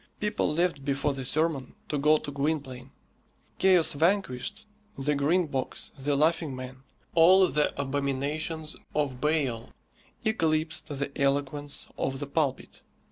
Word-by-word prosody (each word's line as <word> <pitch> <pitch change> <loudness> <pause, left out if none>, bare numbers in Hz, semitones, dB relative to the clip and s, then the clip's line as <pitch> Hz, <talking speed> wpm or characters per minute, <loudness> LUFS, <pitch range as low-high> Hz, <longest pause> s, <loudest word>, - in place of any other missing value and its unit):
People 210 -6 0
left 165 -3 0
before 140 +1 0
the 135 -1 -5
sermon 145 -1 0
to 150 - -1
go 150 +2 +5
to 145 - -6
Gwynplaine. 140 -3 -2 0.7
"Chaos 185 -4 +5
Vanquished," 190 - 0 0.3
the 140 +2 +1
Green 155 +6 +2
Box, 135 -4 -3
the 140 +1 -1
Laughing 155 -1 +1
Man, 130 0 -8 0.3
all 185 +3 +7
the 150 -3 0
abominations 145 +3 -2 0.2
of 140 -4 -1
Baal, 140 -7 0 0.6
eclipsed 160 -6 0
the 140 -2 -3
eloquence 145 +1 -1
of 135 0 -1
the 145 - -3
pulpit. 140 -1 -2
145 Hz, 130 wpm, -28 LUFS, 135-160 Hz, 0.7 s, all